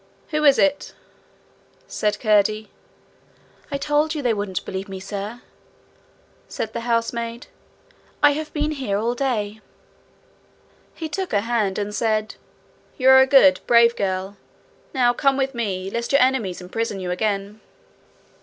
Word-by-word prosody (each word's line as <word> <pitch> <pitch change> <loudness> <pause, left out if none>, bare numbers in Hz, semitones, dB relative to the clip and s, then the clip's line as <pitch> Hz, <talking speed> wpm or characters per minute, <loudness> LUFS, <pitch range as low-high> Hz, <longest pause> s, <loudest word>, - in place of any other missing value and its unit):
'Who 305 -1 -1
is 280 -2 +6
it?' 290 -1 +1 0.9
said 210 -1 -2
Curdie. 215 -1 +2 1.0
'I 280 - -1
told 295 +2 0
you 295 - -4
they 240 -2 +2
wouldn't 205 -3 -4
believe 190 +1 -5
me, 190 -1 -6
sir,' 205 +5 -6 1.0
said 220 0 -5
the - - -3
housemaid. 230 0 -2 0.8
'I 290 - +7
have 305 +1 -4
been 300 0 -1
here 260 -9 -2
all 230 +3 0
day.' 220 -5 -2 1.3
He 325 - -5
took 370 +5 -4
her 205 - +3
hand, 220 -4 -1
and 205 0 -3
said, 215 -1 0 0.6
'You 260 -1 +4
are 265 - +8
a 265 - +4
good, 225 -10 +6
brave 235 0 +5
girl. 190 0 -3 0.5
Now 245 -2 +2
come 275 +2 +1
with 270 0 -1
me, 195 -5 -3
lest 235 +2 -3
your 280 - +5
enemies 235 -9 +1
imprison 205 +3 -3
you 180 -1 -4
again.' 200 +2 -2
230 Hz, 145 wpm, -22 LUFS, 205-265 Hz, 1.3 s, are